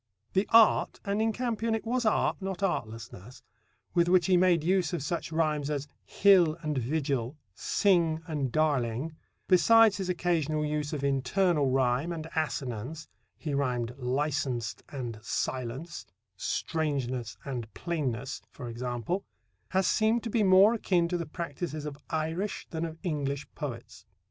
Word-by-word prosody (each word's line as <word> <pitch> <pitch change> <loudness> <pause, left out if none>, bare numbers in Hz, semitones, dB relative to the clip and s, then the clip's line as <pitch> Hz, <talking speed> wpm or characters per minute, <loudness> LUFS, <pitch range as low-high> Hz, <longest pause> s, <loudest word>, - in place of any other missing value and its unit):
The 195 +2 +2
art 225 -1 +5
and 200 +2 0
in 225 0 +2
Campion 230 -1 -1
it 225 - -4
was 240 0 0
art, 215 - +1
not 195 0 -4
artlessness 115 - -4 0.5
with 170 -1 +3
which 180 -1 +5
he 185 - +4
made 175 -3 +4
use 180 -2 +1
of 170 - -2
such 165 +2 -3
rhymes 155 -3 0
as 145 -1 -2 0.2
"hill" 180 -5 +4
and 150 -1 -1
"vigil," 135 0 -1 0.2
"sing" 165 - +2
and 145 -6 -2
"darling," 145 -1 0 0.3
besides 220 +3 +6
his 190 -2 -3
occasional 160 -4 0
use 150 -1 -2
of 145 -3 -3
internal 140 +3 +2
rhyme 130 +4 +1
and 160 -2 -5
assonance 150 -1 -3 0.3
(he 150 -4 -4
rhymed 125 -4 -1
"licens'd" 130 -3 -1
and 120 -6 -5
"silence," 130 +8 -4 0.3
"strangeness" 130 - -2
and 120 -5 -5
"plainness," 135 -7 -3
for 125 -4 -8
example), 120 - -3 0.5
has 190 0 +1
seemed 220 +5 +2
to 230 - -4
be 225 - +2
more 195 +2 +6
akin 180 -6 +1
to 180 - -1
the 170 - -4
practices 155 -1 -5
of 150 -2 -5
Irish 160 +6 -2
than 165 -1 -2
of 160 -1 -7
English 145 -5 -2
poets. 120 -7 -7
155 Hz, 145 wpm, -29 LUFS, 130-180 Hz, 0.5 s, besides